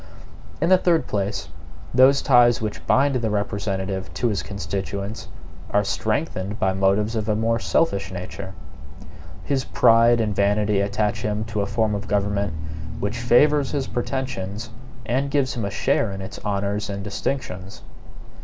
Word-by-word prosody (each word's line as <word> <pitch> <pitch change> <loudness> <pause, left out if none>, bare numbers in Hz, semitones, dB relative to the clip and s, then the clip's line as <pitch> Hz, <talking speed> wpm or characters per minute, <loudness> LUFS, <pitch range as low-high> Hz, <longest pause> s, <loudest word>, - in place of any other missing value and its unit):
In 165 - +1
the 185 -1 +6
third 170 -3 +2
place, 100 0 -2 0.4
those 130 +3 +5
ties 120 -3 +5
which 105 -7 -4
bind 135 0 +3
the 115 -3 -1
representative 100 -2 -2
to 120 - +1
his 105 - -1
constituents 100 +1 -5 0.4
are 105 - +2
strengthened 105 0 -2
by 95 -3 +1
motives 100 +4 +1
of 110 0 -2
a 105 - +2
more 115 +1 +1
selfish 100 -9 0
nature. 95 +1 -7 0.9
His 135 -2 0
pride 115 0 +5
and 105 -2 0
vanity 100 0 +2
attach 105 +1 -1
him 105 0 -2
to 110 -2 -2
a 100 - -1
form 105 +1 0
of 100 0 -4
government 100 -3 0 0.5
which 105 +4 -2
favors 140 +4 +4
his 140 -2 0
pretensions 120 -4 -4 0.3
and 130 +4 0
gives 140 -3 +1
him 115 -4 -3
a - - -1
share 105 +1 +1
in 95 - -6
its 95 0 -7
honors 100 +1 -2
and 100 0 -4
distinctions. 100 -3 -4
105 Hz, 155 wpm, -23 LUFS, 100-120 Hz, 0.9 s, the